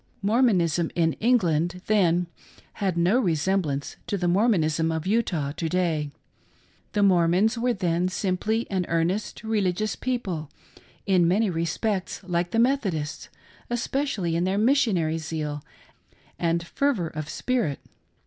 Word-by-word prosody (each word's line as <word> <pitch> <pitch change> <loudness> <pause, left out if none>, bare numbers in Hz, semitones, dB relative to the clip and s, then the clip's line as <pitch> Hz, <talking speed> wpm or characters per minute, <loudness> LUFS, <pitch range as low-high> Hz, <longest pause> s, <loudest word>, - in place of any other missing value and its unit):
Mormonism 190 - +2
in 165 -2 +2
England, 180 -7 +1
then, 180 -5 +3 0.6
had 190 -4 0
no 180 +8 +3
resemblance 160 - 0
to 200 - -1
the 180 -1 -1
Mormonism 165 -5 +2
of 160 0 -3
Utah 185 -9 0
to 160 +2 -3
day. 160 -4 0 0.8
The 205 - +2
Mormons 185 +3 +3
were 240 +1 +1
then 180 -1 0
sim 185 0 -1
ply 220 +4 -1
an 185 -2 -1
earnest 170 +7 -1
religious' 215 -1 0
people, 190 - -3 0.6
in 185 -4 +3
many 200 +3 +2
respects 180 +4 -2
like 175 -1 -1
the 225 - -2
Methodists, 220 - 0 0.4
especially 240 - -1
in 170 - +1
their 190 +2 0
missionary 205 - +2
zeal 155 -2 -4 0.8
and 170 0 0
fervor 225 - 0
of 155 -1 -6
spirit. 210 - -1
180 Hz, 130 wpm, -25 LUFS, 165-215 Hz, 0.8 s, then